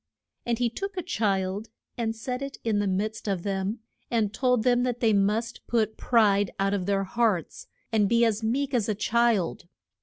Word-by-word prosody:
And 235 -1 +1
he 245 0 +2
took 390 - -5
a 365 - -2
child 200 - -1 0.3
and 225 -2 -2
set 250 +3 -4
it 275 0 -5
in 220 -3 +1
the 205 - 0
midst 215 +4 -2
of 190 -4 -1
them, 200 +3 -2 0.3
and 220 -3 0
told 250 -3 +2
them 245 0 +3
that 245 -1 -1
they 225 -3 +3
must 210 +4 0
put 220 -2 +1
pride 205 -4 +3
out 195 +1 +1
of 190 -2 -2
their 195 -1 +1
hearts 205 -4 -1 0.2
and 210 -3 +3
be 235 0 +4
as 220 -1 0
meek 265 +5 -1
as 225 -4 +1
a 215 - +1
child. 220 -5 +1
220 Hz, 190 wpm, -27 LUFS, 200-240 Hz, 0.3 s, be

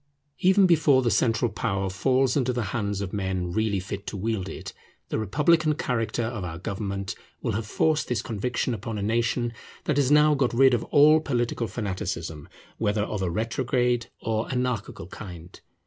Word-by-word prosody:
Even 190 +1 +5
before 150 -6 +4
the 120 - +2
central 115 +2 +2
power 95 -3 -1
falls 130 +7 +1
into 130 -3 +1
the 120 -1 -1
hands 100 -3 -1
of 95 -2 -4
men 95 -3 -2
really 110 0 0
fit 100 +2 -6
to 100 - -4
wield 100 -2 -2
it, - - -7 0.4
the - - -1
republican 150 - +2
character 120 -5 -1
of 115 -3 -3
our 85 -2 -5
government 100 -1 -4 0.3
will - - 0
have 105 +1 -3
forced 155 +7 +1
this 120 -2 -1
conviction 120 +3 -2
upon 110 0 -4
a 100 - -3
nation 115 +2 0 0.3
that 150 - 0
has 140 -3 +3
now 150 +1 +6
got 135 -4 +1
rid 135 +1 +6
of 120 - +1
all 150 +2 +6
political 120 -5 -1
fanaticism, 95 -8 -4 0.3
whether 105 0 +1
of 105 -1 -3
a 95 - 0
retrograde 120 +3 0
or 110 0 -2
anarchical 125 -8 -2
kind. 90 -3 -10
115 Hz, 175 wpm, -26 LUFS, 100-130 Hz, 0.4 s, now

